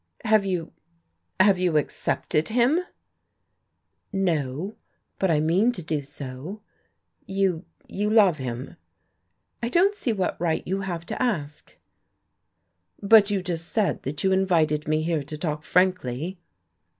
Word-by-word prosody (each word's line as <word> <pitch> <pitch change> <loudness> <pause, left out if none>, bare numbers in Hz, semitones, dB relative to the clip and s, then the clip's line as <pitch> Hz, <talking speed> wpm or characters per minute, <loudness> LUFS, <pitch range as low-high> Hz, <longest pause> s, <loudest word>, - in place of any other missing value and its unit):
"Have 215 -2 +4
you 180 -4 -2 0.7
have 190 -1 +5
you 175 -4 +2
accepted 150 +1 -1
him?" 245 +8 +3 1.3
"No. 175 -1 -1 0.4
But 190 - +2
I 155 -2 +3
mean 180 +10 +3
to 180 - -7
do 155 -2 -2
so." 140 +8 -8 0.6
"You 190 -3 0 0.2
you 210 +1 -2
love 200 -8 +5
him?" 125 0 -5 0.8
"I 235 - -1
don't 375 +9 +4
see 340 - -2
what 190 -5 -2
right 165 -2 0
you 190 +2 -2
have 175 -3 -4
to - - -5
ask." 155 - -3 1.2
"But 205 0 +6
you 200 -3 -1
just 170 -2 -3
said 215 -3 0
that 145 +2 -5
you 190 - +3
invited 165 -6 +2
me 155 0 +1
here 165 -2 0
to 150 +2 -7
talk 150 -1 -3
frankly." 180 -2 0
180 Hz, 135 wpm, -25 LUFS, 155-200 Hz, 1.3 s, But